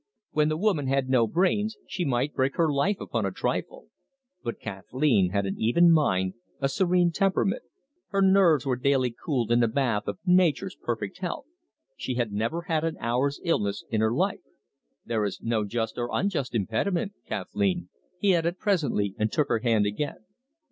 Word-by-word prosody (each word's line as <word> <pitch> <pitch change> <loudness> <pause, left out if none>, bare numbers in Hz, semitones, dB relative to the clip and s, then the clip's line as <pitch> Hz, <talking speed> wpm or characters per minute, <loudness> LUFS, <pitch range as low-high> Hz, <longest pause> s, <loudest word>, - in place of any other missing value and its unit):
When 150 0 +2
the 155 - -1
woman 175 -7 +1
had 135 -1 +1
no 125 -3 +4
brains, 205 - +1
she 180 - -2
might 135 +1 0
break 130 +1 0
her 160 -3 +2
life 185 +9 +1
upon - - -2
a - - -1
trifle. - - -3 0.5
But 120 -2 -4
Kathleen 100 +1 +1
had 100 +1 0
an 95 - -3
even 170 +10 +5
mind, 95 - +2 0.3
a 135 - +1
serene 175 +2 +2
temperament. 195 +2 +1 0.5
Her 195 -1 +1
nerves 190 -7 +5
were 130 -2 0
daily 130 -1 +2
cooled 120 -2 -2
in 120 +1 +4
a 115 - +4
bath 115 -4 0
of - - -3
nature's 180 0 +3
perfect 110 - -4
health. 180 +5 -4 0.5
She 130 - -3
had 120 -3 -1
never 115 +12 -2
had 160 -3 0
an 165 -1 -2
hour's 130 +4 0
illness 105 - 0
in 110 -1 +1
her 110 0 +2
life. 185 +9 0 0.6
"There 115 -2 0
is 100 -2 -3
no 115 -2 0
just 115 +3 -3
or 120 0 -2
unjust 170 -11 -1
impediment, 170 - -1
Kathleen," 195 -4 -1 0.3
he 195 0 +3
added 170 +1 0
presently, 150 - 0
and 110 0 +1
took 145 -2 +1
her 115 - +2
hand 115 -3 +2
again. 110 +2 -3
140 Hz, 175 wpm, -27 LUFS, 115-175 Hz, 0.6 s, even